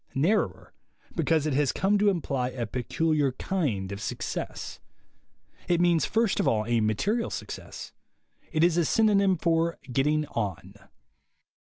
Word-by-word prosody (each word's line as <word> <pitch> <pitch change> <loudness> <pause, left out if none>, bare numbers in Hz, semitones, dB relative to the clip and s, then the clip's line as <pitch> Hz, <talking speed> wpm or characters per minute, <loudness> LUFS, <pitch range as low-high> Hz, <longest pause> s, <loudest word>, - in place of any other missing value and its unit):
Narrower, 175 +11 0 0.4
because 160 -2 +1
it 155 - 0
has 140 0 +2
come 200 +2 +1
to 205 0 +4
imply 140 -9 -1
a 125 -2 -4
peculiar 140 +4 0
kind 125 - -2
of 100 +1 -6
success. - - -5 0.9
It 175 -1 +2
means 175 -2 +3
first 225 -2 +1
of - - +1
all 110 -1 +2
a 120 0 +1
material 195 - 0
success. - - -7 0.6
It 155 0 +2
is 170 -1 +3
a 170 - +3
synonym 200 -2 +3
for 165 0 +1
"getting 150 +4 +1
on." 100 -3 -4
155 Hz, 140 wpm, -27 LUFS, 125-175 Hz, 0.9 s, to